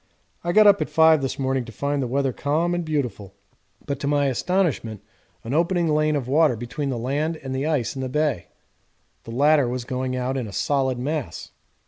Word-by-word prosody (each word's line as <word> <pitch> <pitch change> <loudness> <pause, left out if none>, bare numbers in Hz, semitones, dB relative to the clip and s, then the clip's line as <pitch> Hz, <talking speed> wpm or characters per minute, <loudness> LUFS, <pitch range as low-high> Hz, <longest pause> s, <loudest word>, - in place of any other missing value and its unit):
I 175 - 0
got 215 +4 +6
up 200 -1 +6
at - - -2
5 160 -2 +5
this 135 - -3
morning 135 -1 -1
to 115 - -10
find 140 +5 -2
the 130 - -1
weather 135 +1 0
calm 160 +7 0
and 175 0 -1
beautiful, 125 - -3 0.5
but 140 -1 -3
to 140 - -3
my 145 0 +2
astonishment 135 - -1 0.4
an 115 - -4
opening 170 +2 +1
lane 155 0 +2
of 135 -4 -2
water 150 -1 +3
between 135 +6 -4
the 130 - -2
land 145 +7 -1
and 135 -3 -6
the 135 +3 -1
ice 145 -7 -1
in 135 - -4
the 130 - -3
bay. 150 - -1 0.8
The 115 - -8
latter 145 +1 +3
was 125 0 -3
going 130 0 -3
out 130 +1 -2
in 125 -4 -3
a - - -8
solid 135 0 0
mass. 135 - -4
140 Hz, 205 wpm, -23 LUFS, 125-155 Hz, 0.8 s, got